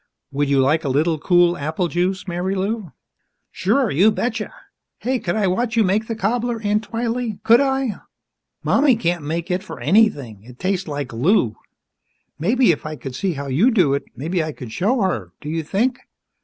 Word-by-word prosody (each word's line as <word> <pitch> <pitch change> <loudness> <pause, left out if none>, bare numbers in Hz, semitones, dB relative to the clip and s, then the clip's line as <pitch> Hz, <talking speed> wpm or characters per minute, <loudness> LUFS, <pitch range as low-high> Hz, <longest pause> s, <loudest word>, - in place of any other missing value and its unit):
Would 140 0 0
you 140 -1 +3
like 145 +5 +2
a 140 - -1
little 155 +4 +1
cool 175 +1 +4
apple 160 +4 -2
juice, 180 +3 -1
Marilou?" 190 +2 -2 0.6
"Sure 220 +6 +1
you 185 +10 +5
betcha! 225 0 -2 0.5
Hey, 255 +1 -1
could 175 - -2
I 215 -2 +1
watch 225 +5 0
you 225 - +5
make 210 +3 +1
the 225 - -3
cobbler, 235 +3 -1
Aunt 210 0 0
Twylee, 230 -1 -2
could 235 +2 +6
I? 265 -4 -1 0.6
Mommy 275 -3 +4
can't 175 -7 -1
make 165 +4 -3
it 180 +1 0
for 210 - -9
anything 145 - +2
it 120 +3 -14
tastes 190 +2 -1
like 145 -3 -4
glue. 120 - +2 0.8
Maybe, 230 - +3
if 155 - -3
I 155 0 -5
could 135 -3 -8
see 185 +7 -1
how 140 -1 -5
you 145 - +3
do 180 - +3
it, 140 - -2
maybe 165 +7 -1
I 155 -1 -4
could 125 -5 -9
show 220 - +1
her. 105 - -1
Do 150 - -7
you 165 +1 -1
think?" 230 - 0
185 Hz, 185 wpm, -21 LUFS, 150-225 Hz, 0.8 s, could